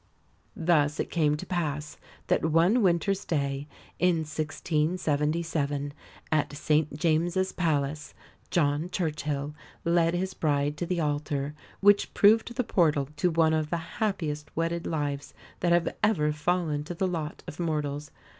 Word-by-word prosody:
Thus 155 -3 +2
it - - -2
came 150 -3 +2
to - - -7
pass 150 -5 -3 0.3
that - - +1
one 165 +9 +4
winter's 190 +1 +2
day 140 -2 -1 0.3
in 175 -3 +3
1677, 150 -1 -1 0.4
at 150 -2 +2
St 150 0 0
James's 175 +3 +1
Palace, 150 -3 -1 0.3
John 150 0 +1
Churchill 150 -5 -2 0.3
led 170 0 +3
his 185 +1 -2
bride 145 -3 0
to 175 - -3
the 180 -1 0
altar, 145 -1 -1 0.3
which 205 0 +4
proved 225 +3 +4
the 250 - +1
portal 150 - +2
to 180 - +2
one 160 -1 +3
of 155 -1 0
the 170 - 0 0.2
happiest 155 -8 -1
wedded 165 +1 -1
lives 145 -3 -3 0.2
that 175 - +1
have 175 -1 +2
ever 150 -9 +3
fallen 150 -1 0
to 175 - -5
the 190 - 0
lot 160 -4 -4
of 155 - -8
mortals. 150 -3 -2
155 Hz, 140 wpm, -28 LUFS, 150-175 Hz, 0.4 s, one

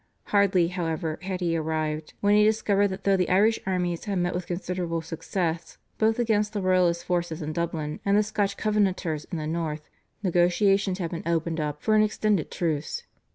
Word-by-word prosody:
Hardly, 195 -4 +4
however, 165 -3 -3
had 185 0 -4
he 170 -2 +1
arrived, 155 -1 -2
when 205 0 +4
he 210 - +6
discovered 210 -2 +3
that 190 0 -6
though 195 -1 +4
the 180 -2 0
Irish 210 +5 +4
armies 180 -2 -1
had 200 -2 -1
met 175 0 0
with 180 0 -4
considerable 175 -2 -3
success 165 +1 -3 0.2
both 220 0 +3
against 215 -3 +1
the 205 - -2
Royalist 180 -2 +2
forces 175 -3 -1
in 155 +1 -4
Dublin 160 -2 -3
and 200 0 +3
the 210 - +4
Scotch 205 -1 -1
Covenanters 190 -7 0
in 170 - -5
the 155 - -3
North, 155 -1 -3 0.4
negotiations 185 +2 +2
had 170 -4 -3
been 170 -1 -5
opened 165 -1 0
up 150 -1 -3
for 215 - +2
an 215 - +6
extended 210 -4 +1
truce. 165 - -2
180 Hz, 185 wpm, -26 LUFS, 165-200 Hz, 0.4 s, he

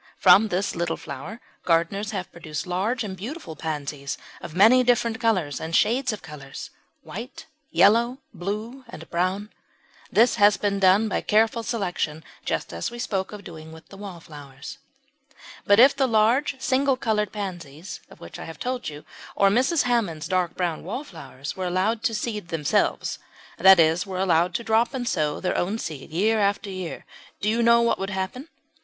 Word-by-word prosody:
From 220 +2 +7
this 190 0 -1
little 170 -1 -1
flower 160 - -8 0.2
gardeners 175 +5 +1
have 195 -4 -4
produced 155 -3 -6
large 200 +7 -1
and 195 -3 -5
beautiful 225 - -7
pansies 145 -3 -4 0.2
of 155 - -8
many 230 +7 +6
different 235 -2 +1
colours 185 - 0
and 160 +1 -3
shades 250 +4 +2
of 215 - -7
colours 150 -3 -9 0.3
white, 255 - -8 0.2
yellow, 235 +5 +4 0.2
blue, 215 +8 -5
and 165 -6 -10
brown. 185 +4 -1 0.6
This 235 +2 +4
has 205 -1 +5
been 200 -1 0
done 195 +3 +5
by 205 - -1
careful 225 +2 +2
selection, 180 -9 -2 0.2
just - - -3
as - - -3
we 240 - -9
spoke 195 -5 -2
of 210 -1 -9
doing 160 -2 -10
with 160 +1 -14
the 195 - -12
wallflowers. 165 - -10 0.9
But 205 +1 +6
if 270 +4 +7
the 270 -1 +2
large 240 +5 +2
single 265 0 +2
coloured 210 -4 0
pansies 175 -5 -6
of - - -16
which 85 - -10
I - - -7
have 165 -1 -9
told 250 -4 -3
you, 150 0 -10 0.3
or 195 - +4
Mrs. 260 +8 +2
Hammond's 200 -11 0
dark 180 -2 0
brown 175 -3 -2
wallflowers, 160 - -7
were 185 -1 -3
allowed 190 +5 0
to 225 - +1
seed 210 -3 -3
themselves 160 -3 0 0.4
that 190 0 +8
is, 165 +3 +3
were 190 -1 -4
allowed 175 -1 +2
to 235 - -1
drop 230 +4 +2
and 245 -2 -3
sow 150 -6 0
their 185 - -1
own 195 +5 0
seed 155 -10 -6
year 210 +7 +1
after 200 0 0
year 185 -3 -6 0.3
do 205 - -2
you 225 +2 +2
know 235 0 +5
what 235 - +1
would 195 +1 -3
happen? 195 - -4
195 Hz, 175 wpm, -24 LUFS, 165-230 Hz, 0.9 s, that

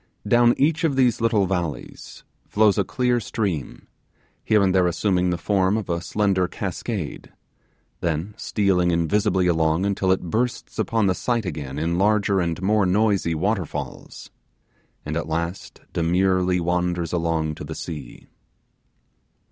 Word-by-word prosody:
Down 120 +2 +5
each 160 +4 +2
of 155 -4 +2
these 125 -4 +2
little 110 -4 +3
valleys 90 -5 -5 0.2
flows 105 -1 +3
a - - +3
clear 125 +3 0
stream, 100 - -4 0.6
here 105 -2 +3
and 95 -1 +2
there 90 -2 +3
assuming 90 0 +1
the 90 - 0
form 95 +2 +1
of 105 -5 -3
a 85 0 -1
slender 95 +1 +1
cascade, 95 -2 -5 0.7
then 85 +5 -2
stealing 95 -4 +1
invisibly 90 +2 +1
along 80 +1 +2
until 95 -1 +1
it 95 - +1
bursts 120 0 -2
upon 110 +1 +1
the 95 - +3
sight 120 +2 -1
again 70 -5 -5
in 85 +3 -1
larger 100 -1 +2
and 85 +1 -2
more 105 0 +3
noisy 100 -3 +2
waterfalls, 95 +1 -4 0.7
and 75 - -3
at 80 -1 -3
last 85 +3 -4
demurely 90 +2 +2
wanders 90 -1 -1
along 80 -2 0
to - - -8
the - - -6
sea. 80 -5 -8
95 Hz, 140 wpm, -23 LUFS, 85-105 Hz, 0.7 s, Down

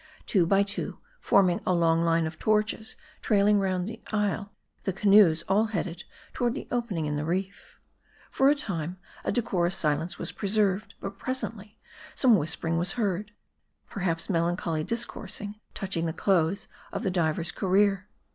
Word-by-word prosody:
Two 180 -5 +2
by 195 +2 +4
Jwo, 200 0 -4 0.2
forming 185 -3 +3
a 185 - +1
long 165 -1 +3
line 165 -1 +2
of 160 0 -6
torches 215 0 0 0.3
trailing 205 0 +3
round 185 -2 -1
the 225 +1 -7
isle, 210 -1 -1 0.3
the 195 - -1
canoes 195 -4 +5
all 205 +3 +3
headed 180 -5 -4 0.3
toward 240 0 0
the - - -6
opening 230 -10 -1
in 150 0 -2
the 145 - -2
reef. 190 +5 -4 0.5
For 270 +1 +4
a 290 - +4
time, 180 - -3 0.3
a - - 0
decorous 195 -6 +1
silence 155 +1 0
was - - -4
preserved; 205 -1 0
but 195 0 -6
pres 260 0 -2
ently, 210 -1 -7 0.4
some 255 - +5
w 210 -7 +5
r - - -2
hispering 165 +1 -1
was 175 - +2
heard; 210 -3 -2 0.6
perhaps 175 -5 -2
melancholy 170 -2 0
dis 230 +6 0
coursing 210 0 -5 0.2
touching 185 -4 -2
the 160 - -2
close 185 0 +1 0.2
of - - -4
the 190 - 0
diver's 170 -1 0
career. 195 +1 +2
195 Hz, 165 wpm, -27 LUFS, 170-210 Hz, 0.6 s, canoes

